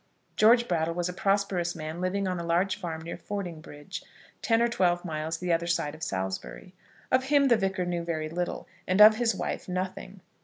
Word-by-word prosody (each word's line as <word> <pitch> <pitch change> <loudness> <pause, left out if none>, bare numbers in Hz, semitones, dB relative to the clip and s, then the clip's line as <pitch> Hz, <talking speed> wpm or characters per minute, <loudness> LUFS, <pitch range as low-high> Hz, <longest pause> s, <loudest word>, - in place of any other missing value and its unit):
George 235 +3 +5
Brattle 165 -1 0
was 175 0 -1
a - - -4
prosperous 195 -3 0
man, 155 +3 -6
living 195 +2 -1
on 180 -1 -2
a - - -4
large 170 +3 +1
farm 165 -5 -5
near 170 - -6
Fordingbridge, 175 -4 -6 0.4
ten 225 -1 +2
or 235 - +3
twelve 180 -6 +1
miles 160 0 -3
the 175 0 0
other 170 +1 0
side 155 -3 0
of 155 - -12
Salisbury. 95 - -4 0.4
Of 260 0 +3
him 280 0 +4
the 235 - +6
Vicar 195 -3 -1
knew 175 -1 -2
very 160 -2 -2
little, 175 +2 -4 0.2
and 185 +2 +1
of 215 +1 +9
his 235 -1 +1
wife - - -4
nothing. 185 +1 -4
180 Hz, 195 wpm, -28 LUFS, 165-200 Hz, 0.4 s, of